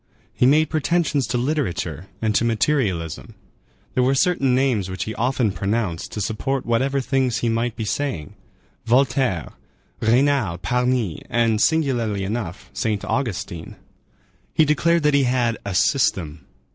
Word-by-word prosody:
He 125 - +3
made 155 +2 +3
pretensions 155 -4 +1
to 125 +2 -1
literature 100 - -2 0.2
and 110 -1 +2
to 110 - +2
materialism. 110 - -1 0.6
There 130 - +2
were 130 +2 +3
certain 135 -5 +2
names 125 -8 +1
which 95 0 -3
he 110 - -5
often 120 -2 0
pronounced 95 -1 -2
to 105 - -3
support 130 +6 -2
whatever 130 +4 +1
things 130 -2 0
he 120 - +1
might 115 +1 -1
be 110 - -4
saying,—Voltaire, 120 - -2 0.5
Raynal, 120 -5 +2
Parny, 125 - 0
and, 115 -2 +2
singularly 120 -11 +1
enough, 100 -3 -5
Saint 110 -4 -2
Augustine. 100 -10 -3 0.8
He 155 - +5
declared 170 +2 +2
that 150 0 +3
he 140 -1 +4
had 120 -3 +1
"a 100 - -3
system." 90 - +1
120 Hz, 135 wpm, -22 LUFS, 100-135 Hz, 0.8 s, He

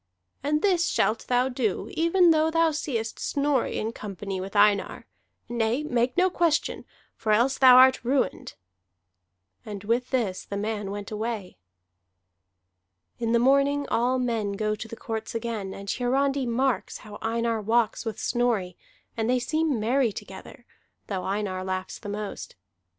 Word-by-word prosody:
"And 300 +2 0
this 360 -4 +3
shalt 220 +1 0
thou 250 +1 +2
do 245 -6 -2
even 335 +2 +4
though 315 0 +3
thou 330 0 +3
seest 240 -7 -3
Snorri 285 -2 0
in 220 - -2
company 195 -3 -6
with 195 +2 -7
Einar. 205 -1 +3 0.4
Nay, 240 +3 0
make 250 -2 0
no 365 +1 +5
question, 340 -3 0 0.3
for 215 - -2
else 240 +5 +3
thou 255 -2 +8
art 260 -1 +6
ruined." 260 +2 -1 1.1
And 205 -2 -7
with 235 +4 0
this 225 -8 -1
the 200 - -5
man 210 -1 -3
went 205 +1 -6
away. 215 - -4 1.6
In 230 -1 -1
the 235 - +4
morning 280 +3 +3
all 250 +2 +1
men 230 -5 -1
go 215 +1 -1
to 215 +1 -6
the 230 - -8
courts 225 0 -5
again; 225 -4 -3
and 195 +1 -9
Hiarandi 270 +4 0
marks 255 +1 0
how 210 -1 -10
Einar 230 0 -1
walks 225 +2 +1
with 220 -3 -4
Snorri, 230 -8 0 0.4
and 225 0 -1
they 255 - +3
seem 310 +1 0
merry 240 +2 +2
together, 195 +6 -10 0.4
though 190 -3 -4
Einar 195 -2 -2
laughs 185 0 -4
the 205 - -8
most. 205 0 -6
235 Hz, 150 wpm, -26 LUFS, 210-265 Hz, 1.6 s, thou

